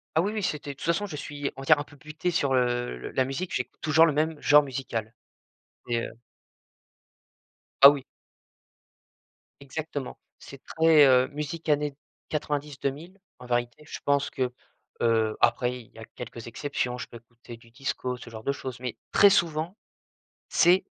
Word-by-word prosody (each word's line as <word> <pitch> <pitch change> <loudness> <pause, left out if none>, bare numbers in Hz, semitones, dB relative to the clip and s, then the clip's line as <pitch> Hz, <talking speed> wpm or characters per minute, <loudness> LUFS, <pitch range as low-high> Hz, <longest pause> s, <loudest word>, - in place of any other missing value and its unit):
Ah 160 - +5
oui, 200 +5 0
oui, 215 - -2
c'était 150 -5 -2
de - - -14
toute - - -9
façon 170 +5 +1
je 165 -7 -7
suis 145 -1 -4
on 135 - -7
va - - -7
dire 150 +2 +6
un 145 - -3
peu 145 - -17
«buté» 155 +4 -3
sur, 140 -5 +1
heu, 120 - 0
le - - -7
la 130 - +2
musique 135 +8 -4
j'ai - - -2
toujours 160 +1 +5
le 165 - +3
même 155 +1 0
genre 150 0 +7
musical 125 -5 -4 0.8
et 120 -1 +1
heu - - -10 1.7
Ah - - +15
oui. 145 -2 -3 1.6
Exactement, 140 -1 -5 0.2
c'est 140 -1 -12
très, 160 -2 +7
heu, 130 -1 +5
musique 150 +2 -6
années 145 -1 +1 0.3
90-2000 150 +3 -3 0.2
en 125 - -11
vérité. 120 +4 -2
Je - - -7
pense 140 0 +2
que 125 -1 -2 0.5
heu, 110 -2 +2
après 125 +1 +2
il 110 - -22
y - - -16
a 110 - -8
quelques 120 -1 -8
exceptions, 125 0 -3
je - - -5
peux 120 - -10
écouter 120 +1 -13
du 115 0 -20
disco, 125 0 -3
ce 120 - -11
genre 110 -1 -9
de 140 - +1
choses, 130 -3 -7
mais 125 -2 -4 0.2
très 200 - +7
souvent 165 +1 +1 0.7
c'est, 180 +2 +4
140 Hz, 175 wpm, -27 LUFS, 125-155 Hz, 1.7 s, Ah